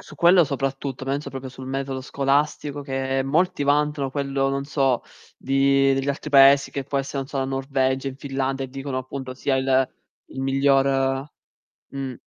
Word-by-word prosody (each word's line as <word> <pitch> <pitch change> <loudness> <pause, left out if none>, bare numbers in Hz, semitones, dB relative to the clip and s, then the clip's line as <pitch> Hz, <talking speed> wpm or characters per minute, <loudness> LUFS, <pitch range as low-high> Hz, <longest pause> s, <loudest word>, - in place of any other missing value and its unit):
Su - - -14
quello 175 +1 +6
soprattutto, 135 -1 -3
penso 140 +2 -3
proprio 135 0 -6
sul 130 0 -10
metodo 135 0 -3
scolastico 145 +2 -1
che 135 -1 -1
molti 155 +3 +1
vantano 145 -1 +1
quello, 140 -1 -1
non 140 0 -2
so, 135 -4 +1 0.3
di 135 0 +3
degli 135 +1 -2
altri 140 +2 -3
paesi 140 0 +6
che 140 - -3
può 140 +1 -2
essere, 135 +1 -4
non 135 - -3
so, 140 - -4
la 135 - 0
Norvegia, 135 0 -1
in 130 - -8
Finlandia 135 -1 -2
e - - -7
dicono 135 0 -4
appunto 130 0 -6
sia 135 +1 0
il 130 0 +2 0.4
il 135 - -7
miglior 135 0 +2 0.6
mh. 135 -2 -5
135 Hz, 170 wpm, -23 LUFS, 135-140 Hz, 0.6 s, quello